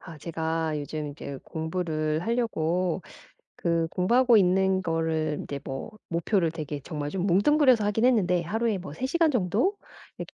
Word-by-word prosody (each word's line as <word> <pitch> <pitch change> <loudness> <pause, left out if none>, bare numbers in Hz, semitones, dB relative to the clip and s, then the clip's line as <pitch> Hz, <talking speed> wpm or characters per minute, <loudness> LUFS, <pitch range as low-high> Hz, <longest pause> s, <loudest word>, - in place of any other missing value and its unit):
아 165 -3 -11
제가 160 -1 -2
요즘 150 +1 -4
인제 140 -1 -7
공부를 160 -2 -2
하려고, 185 -6 0 0.5
그 170 -1 0
공부하고 240 +6 +4
있는 190 -1 +3
거를 160 -3 -1
인제 140 -1 -6
뭐 135 +9 -5 0.2
목표를 170 +1 +1
되게 150 -3 -5
정말 145 -1 -5
좀 190 +2 -2
뭉뚱그려서 245 - +4
하긴 210 +3 +1
했는데 185 -9 +3
'하루에 220 +4 -1
뭐 180 -5 -8
3 255 - -3
시간 330 +3 +2
정도 245 - +1 0.4
이렇게 - - -8
175 Hz, 315 characters per minute, -27 LUFS, 160-215 Hz, 0.5 s, 공부하고